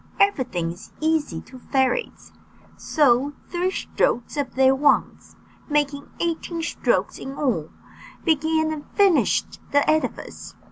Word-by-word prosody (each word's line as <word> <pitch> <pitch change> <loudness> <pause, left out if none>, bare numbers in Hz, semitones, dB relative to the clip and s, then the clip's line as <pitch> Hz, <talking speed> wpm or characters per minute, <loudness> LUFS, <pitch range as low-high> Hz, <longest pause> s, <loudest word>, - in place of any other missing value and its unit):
Everything 250 - +1
is 175 +4 -12
easy 310 - 0
to 255 +1 -13
fairies; 265 - -1 0.4
so 280 -2 +2 0.2
three 355 +1 0
strokes 245 -9 -1
of 280 -4 -3
their 265 0 +5
wands, 285 +2 +1 0.3
making 285 -1 0
eighteen 335 0 -2
strokes - - 0
in 270 +1 -7
all, 230 - -1 0.6
began 315 0 +2
and 295 -2 -8
finished 395 -5 +3
the 285 0 +3
edifice. 310 0 -2
290 Hz, 120 wpm, -23 LUFS, 260-320 Hz, 0.6 s, their